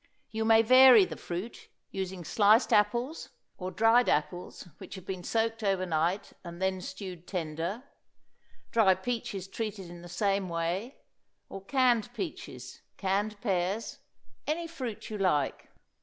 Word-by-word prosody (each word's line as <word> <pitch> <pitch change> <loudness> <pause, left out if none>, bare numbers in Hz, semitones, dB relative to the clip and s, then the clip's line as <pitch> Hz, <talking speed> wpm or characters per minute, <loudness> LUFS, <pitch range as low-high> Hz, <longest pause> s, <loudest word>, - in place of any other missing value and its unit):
You 220 0 -2
may 225 0 +6
vary 255 -3 +8
the - - -7
fruit, 180 +7 -7 0.2
using 190 -2 -4
sliced 210 +7 +4
apples, 240 +9 +1 0.3
or 185 0 -3
dried 225 +5 +4
apples 155 +5 -2
which - - -9
have 190 -2 -10
been 185 -2 -5
soaked 225 +1 -1
over 195 -2 +1
night, 170 +3 -1
and 170 -1 -9
then 190 0 0
stewed 185 -2 -8
tender, 170 +5 -3 0.9
dried 190 -5 +3
peaches 220 -6 -3
treated 200 -3 -5
in 175 0 -10
the 175 - -11
same 195 +1 0
way, 170 +9 -2 0.5
or 195 - -8
canned 245 -1 +2
peaches, 350 - -7 0.2
canned 205 +2 -1
pears 195 +1 -1 0.5
any 325 +3 -1
fruit 255 -11 -6
you 210 - -4
like. 150 -8 0
195 Hz, 140 wpm, -29 LUFS, 180-225 Hz, 0.9 s, vary